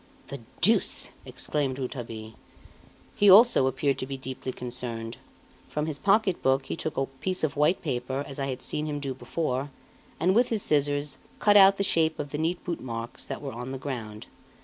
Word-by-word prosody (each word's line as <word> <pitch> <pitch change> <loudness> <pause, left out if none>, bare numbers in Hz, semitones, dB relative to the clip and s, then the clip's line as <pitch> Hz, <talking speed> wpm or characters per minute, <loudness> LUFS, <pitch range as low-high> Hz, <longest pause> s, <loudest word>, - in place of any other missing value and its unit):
"The - - -6 0.2
deuce!" - - +3 0.2
exclaimed 140 -4 -2
Rouletabille. 115 -4 -6 0.8
He, 205 - +5
also, 200 - +7
appeared 140 +1 0
to 130 - -3
be 135 0 -5
deeply 130 0 -5
concerned. 120 -2 -5 0.5
From 150 0 -2
his 155 -2 -3
pocket 200 -2 +2
book 135 0 +2
he - - -4
took 160 -2 -4
a 135 - +1
piece 150 +8 -3
of 155 - 0
white 150 +5 +2
paper 130 -1 -2
as 140 0 -6
I 135 - -1
had 130 -2 -4
seen 150 +1 -2
him 145 -1 -3
do 135 -2 -3
before, 135 0 -3 0.5
and 185 +2 +3
with 240 +4 +3
his 220 -3 0
scissors, 145 -1 +1 0.2
cut 205 -1 +4
out 195 -1 +8
the 200 - +1
shape 160 -4 +2
of 145 -1 -5
the 150 - -3
neat 170 +3 -1
bootmarks 120 -8 -5
that - - -6
were 135 - -5
on 125 +3 -6
the - - -4
ground. 115 -6 -6
140 Hz, 190 wpm, -27 LUFS, 130-160 Hz, 0.8 s, out